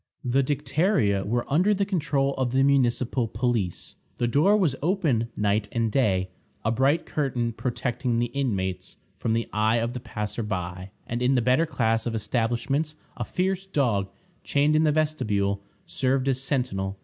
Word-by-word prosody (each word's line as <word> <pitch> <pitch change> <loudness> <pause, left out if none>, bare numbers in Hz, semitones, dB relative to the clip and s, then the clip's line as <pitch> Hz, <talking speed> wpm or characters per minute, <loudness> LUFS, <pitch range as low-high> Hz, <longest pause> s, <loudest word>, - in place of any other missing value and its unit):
The 130 +2 +3
Dicteria 140 - +1
were 120 +3 0
under 180 +9 +3
the 200 0 +1
control 145 -7 0
of 130 -2 -1
the 135 +1 +4
municipal 125 -3 +2
police. 110 -5 -2 0.2
The 120 - +1
door 155 - +4
was 165 -10 +2
open 150 - +1
night 105 0 +1
and 115 -2 0
day, 95 -8 +1 0.3
a 110 - +2
bright 135 +7 +2
curtain 125 -5 -1
protecting 120 0 -2
the 120 0 0
inmates 95 -9 -2 0.2
from 115 - 0
the 115 0 0
eye 110 +2 +2
of 115 +1 -1
the 125 - -4
passer 105 -2 -4
by; 90 -3 -4 0.2
and 120 +1 -3
in 130 +2 +3
the - - +4
better 130 +7 +3
class 115 -5 0
of 115 - -2
establishments, 120 +7 -1 0.2
a - - -3
fierce 190 +1 -1
dog, 115 - +1 0.3
chained 145 +2 +2
in 155 +1 +4
the 150 - +4
vestibule, 105 -11 0 0.2
served 130 0 0
as 130 -1 +1
sentinel. 100 -9 -1
125 Hz, 165 wpm, -26 LUFS, 110-140 Hz, 0.3 s, the